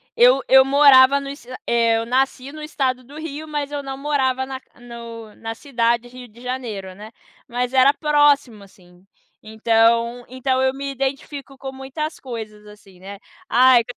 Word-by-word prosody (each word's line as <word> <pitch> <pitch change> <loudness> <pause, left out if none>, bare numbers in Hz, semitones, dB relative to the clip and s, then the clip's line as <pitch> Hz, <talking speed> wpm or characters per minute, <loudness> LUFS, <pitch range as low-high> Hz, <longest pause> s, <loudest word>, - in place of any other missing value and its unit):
eu 250 +3 +5
eu 265 0 +7
morava 275 -1 +6
no 275 0 -7
es 280 -2 -10 0.2
eh, 230 -1 +2
eu 225 - -2
nasci 260 +2 -1
no 305 0 -9
estado 260 -4 -2
do 275 +4 -15
Rio, 315 0 -7
mas 295 -1 -4
eu 285 -1 -4
não 270 -1 -6
morava 265 -2 0
na 265 0 -7 0.2
no 230 -2 -10
na 225 0 -6
cidade 235 -2 -1
Rio 250 0 -12
de 230 +2 -18
Janeiro, 225 -7 -5
né. 215 +2 -11 0.4
Mas 245 +1 -3
era 265 +2 +5
próximo, 290 -7 +2
assim. 180 -2 -21 0.4
Então 230 +2 +1
então 260 +1 -1
eu 260 0 +1
me 275 +1 -5
identifico 275 +1 -5
com 270 0 -7
muitas 270 +4 -6
coisas 220 -4 -8
assim, 205 -3 -17
né. 195 +2 -10 0.3
Ai 250 0 +5
255 Hz, 165 wpm, -21 LUFS, 230-275 Hz, 0.4 s, eu